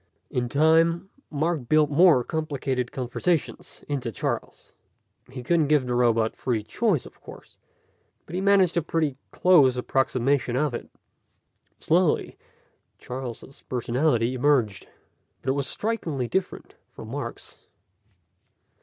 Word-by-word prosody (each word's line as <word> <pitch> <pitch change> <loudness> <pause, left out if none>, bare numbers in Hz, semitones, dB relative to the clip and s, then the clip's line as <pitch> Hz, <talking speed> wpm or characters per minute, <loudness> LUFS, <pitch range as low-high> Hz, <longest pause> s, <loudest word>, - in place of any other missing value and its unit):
In 125 -1 -1
time, 165 +5 +3 0.2
Mark 155 -3 -2
built 155 -1 +4
more 155 -4 +5
complicated 135 -5 -3
conversations 140 +6 -3
into 130 -5 -3
Charles. - - -5 0.6
He 125 -1 -8
couldn't 160 +2 +2
give 145 -3 +3
the 125 - -2
robot 115 -2 +2
free 115 -5 -2
choice, 185 - 0
of - - -15
course, - - -14 0.7
but - - -12
he 185 - -1
managed 195 -3 +4
a 170 - +2
pretty 155 -3 -1
close 145 -9 +4
approximation 130 0 0
of 145 0 0
it. 120 - -6 0.9
Slowly, 170 -1 +1 0.6
Charles' 130 +1 -8
personality 125 0 +1
emerged. 130 -6 +1 0.6
But 130 - -2
it - - +3
was 140 -1 -2
strikingly 165 - -2
different 190 +9 -3 0.2
from - - -11
Mark's. - - -7
140 Hz, 120 wpm, -25 LUFS, 125-165 Hz, 0.9 s, more